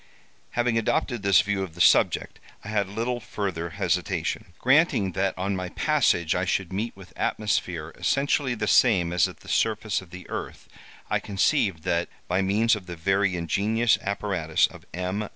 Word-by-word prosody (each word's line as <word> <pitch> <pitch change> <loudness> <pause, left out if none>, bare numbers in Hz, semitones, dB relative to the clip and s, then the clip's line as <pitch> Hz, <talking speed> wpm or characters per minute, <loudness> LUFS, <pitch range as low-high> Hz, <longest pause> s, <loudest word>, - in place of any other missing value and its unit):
"Having 120 -1 +2
adopted 120 +1 -1
this 100 -2 +5
view 100 -1 -1
of 90 -4 -6
the - - -13
subject, - - +3 0.2
I 100 - -8
had 100 -2 0
little 120 +4 -2
further 95 -7 -4
hesitation. 80 - -1
Granting 130 - +3
that 95 +2 -1
on 95 +2 -1
my 90 -1 -4
passage 130 - +2
I 90 - 0
should 95 0 -1
meet 110 +2 -3
with 95 -2 -14
atmosphere 85 -6 -2
essentially 140 -2 +1
the 105 - -2
same 95 -8 +4
as 90 - +3
at - - -12
the - - -16
surface 110 -2 0
of 95 - -15
the 90 +1 -10
earth, - - -6 0.4
I - - +2
conceived 95 - 0
that, 85 0 0 0.2
by 90 +2 +1
means 110 +4 +3
of 95 -3 -9
the 90 - -6
very 95 +3 +1
ingenious 105 +7 +1
apparatus 95 -6 0
of - - -10
M. 95 +4 -3
100 Hz, 170 wpm, -25 LUFS, 90-110 Hz, 0.4 s, this